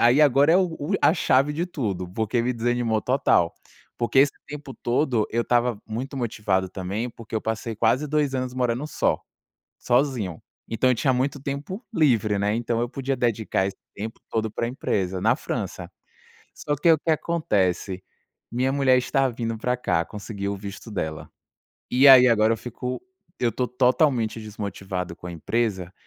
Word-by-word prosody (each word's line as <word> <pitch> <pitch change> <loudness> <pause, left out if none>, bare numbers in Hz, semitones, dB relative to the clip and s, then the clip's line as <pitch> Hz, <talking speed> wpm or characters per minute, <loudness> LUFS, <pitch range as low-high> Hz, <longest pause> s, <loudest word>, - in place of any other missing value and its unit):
aí 120 +5 +5
agora 145 +2 +5
é - - +7 0.5
a - - +6
chave 140 -3 +3
de 170 +4 -2
tudo, 100 - -3
porque 110 +5 -1
me 125 +1 0
desanimou 120 -1 0
total, 125 -10 +2 0.5
porque 120 +2 +1
esse 140 -1 +4
tempo 145 -2 -8
todo 120 -3 0
eu 115 +1 +1
estava 120 -2 +1
muito 125 +6 -5
motivado 105 -6 -1
também, 100 +6 -3
porque 115 -1 -11
eu 110 - -1
passei 110 0 -3
quase 125 +7 +2
2 145 -2 +1
anos 130 -1 -2
morando 125 +2 0
só, - - 0 0.6
sozinho, 120 - 0 0.3
então 120 +3 +1
eu - - +4
tinha 130 +3 +2
muito 135 +3 0
tempo 145 - -5
livre, 115 - +2
né, 105 +1 +1
então 115 0 -1
eu 120 - -1
podia 135 +1 -2
dedicar 110 -5 0
esse 100 - -5 0.2
tempo 110 +2 -6
todo 110 -1 -1
pra 115 - -2
empresa 95 -7 -2
na 115 +5 +3
França. - - -5 0.6
Só 145 -1 -2
que 165 +4 +5
o 160 - +5
que 165 - -1
acontece, 100 - 0 0.5
minha 130 +2 +1
mulher 135 -2 +4
está 135 +1 +1
vindo 115 -2 -3
pra 125 +3 0
cá, 85 -8 0
conseguiu 100 -1 -5
o - - -6
visto 100 +3 -8
dela. 80 -6 -4 0.6
E 130 +3 +4
aí 130 -1 +10
agora 110 -1 +4
eu 115 - -3
fico 125 +2 -5 0.4
eu 120 - +2
tô 125 +4 -1
totalmente 125 -3 +2
desmotivado 95 -4 -5
com - - -14
a - - -6
empresa 95 0 -2
120 Hz, 170 wpm, -24 LUFS, 105-135 Hz, 0.6 s, aí